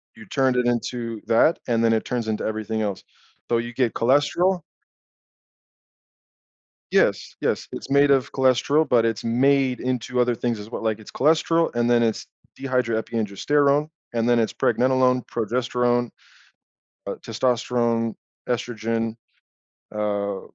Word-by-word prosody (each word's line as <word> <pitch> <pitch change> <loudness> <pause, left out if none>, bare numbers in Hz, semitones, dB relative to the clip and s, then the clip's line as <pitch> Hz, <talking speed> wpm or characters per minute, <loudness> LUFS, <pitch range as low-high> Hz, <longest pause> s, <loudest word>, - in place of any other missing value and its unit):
you 220 - -13
turned 135 -9 +1
it 125 -1 +1
into 120 -2 -2
that, 115 +8 +3
and 115 -1 +1
then 115 - +4
it 110 - 0
turns 120 -3 -3
into 110 -1 -2
everything 110 0 -3
else. 100 -3 -3 0.5
So, 120 - +2
you 120 +1 -4
get 120 -2 0
cholesterol 145 +9 +2 2.3
Yes - - +1
yes, - - -1
it's - - -7
made 140 +1 +4
of 135 -3 +2
cholesterol, 135 +4 +2
but 120 -2 +3
it's 115 -2 -1
made 130 +2 +2
into 125 0 -1
other 120 -1 +2
things 120 0 -2
as 105 +2 -10
well, - - -5
like 110 -1 -1
it's 110 - -12
cholesterol 165 +3 +2
and 120 0 +1
then 120 -1 +4
it's 115 -2 -1 0.3
dehydroepiandrosterone 130 +3 0 0.3
and 115 0 +1
then 120 -1 +4
it's 115 - +1
pregnenolone, 130 0 +2
progesterone, 120 +1 0 1.0
uh, - - -3
testosterone, 115 -1 0 0.3
estrogen, 115 -1 -2 0.8
uh 100 -2 -2
120 Hz, 135 wpm, -23 LUFS, 115-130 Hz, 2.3 s, then